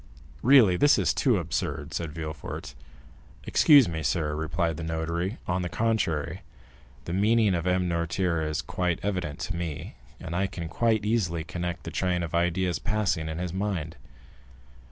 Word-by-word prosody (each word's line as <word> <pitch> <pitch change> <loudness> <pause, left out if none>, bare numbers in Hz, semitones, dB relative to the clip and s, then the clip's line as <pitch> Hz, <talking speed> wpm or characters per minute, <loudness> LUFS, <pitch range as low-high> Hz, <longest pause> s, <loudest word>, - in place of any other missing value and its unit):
"Really, 115 -8 +6
this 145 +6 +5
is - - +2
too 125 -7 +2
absurd," 80 -3 -3
said 80 0 -3
Villefort. 75 -5 -6 0.7
"Excuse 145 -6 +6
me, 80 -2 -3
sir," 80 -2 0
replied 80 +1 -1
the 85 - -5
notary; 85 +5 -2
"on 90 +1 0
the 90 - -3
contrary, 85 -6 -1 0.6
the 85 - -4
meaning 105 +1 +3
of 85 0 -1
M. 90 0 +2
Noirtier 85 0 0
is 75 0 -2
quite 90 +1 -1
evident 90 -7 -2
to 90 +2 -3
me, 85 -4 -5 0.2
and 85 - -6
I 95 +2 +1
can 85 -3 -6
quite 110 +4 +1
easily 90 -7 0
connect 90 0 -4
the - - -6
train 90 -2 0
of 85 - -5
ideas 85 0 +1
passing 105 -8 -1
in 80 - -4
his 90 -1 -3
mind." 95 -5 -2
85 Hz, 160 wpm, -27 LUFS, 80-95 Hz, 0.7 s, Really